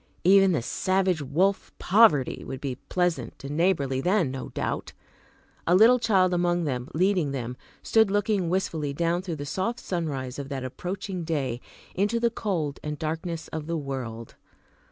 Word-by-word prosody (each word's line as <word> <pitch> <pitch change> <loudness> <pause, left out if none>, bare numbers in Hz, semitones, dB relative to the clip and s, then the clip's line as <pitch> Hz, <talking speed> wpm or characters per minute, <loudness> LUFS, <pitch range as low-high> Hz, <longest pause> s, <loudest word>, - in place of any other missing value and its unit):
Even 195 +1 +6
the 145 -9 0
savage 185 +3 +1
wolf 185 +8 0
Poverty 175 - +4
would 130 - -6
be 135 -1 -3 0.2
pleasant 175 -5 -1
and 140 +2 -5
neighborly 145 -7 +1
then, 180 -4 +2
no 130 -1 -6
doubt! - - -3 0.7
A 175 - +5
Little 230 +6 +7
Child 190 -6 +3
among 175 0 +1
them, 125 -4 -3
leading 180 -4 +2
them, 125 -2 -4 0.3
stood 220 -2 +4
looking 205 -3 +1
wistfully 160 -6 -1
down 170 +2 +1
through 180 -3 -4
the 145 -1 -6
soft 225 - -2
sunrise 145 - -3
of 140 -1 -6
that 135 -2 -4
approaching 185 - -5
day, 135 -7 -2 0.3
into 205 +5 +1
the 235 0 +2
cold 170 -11 -2
and 150 0 -4
darkness 160 +1 -4
of 160 -1 -5
the 170 0 -1
world. 125 -6 -5
170 Hz, 160 wpm, -26 LUFS, 140-190 Hz, 0.7 s, Little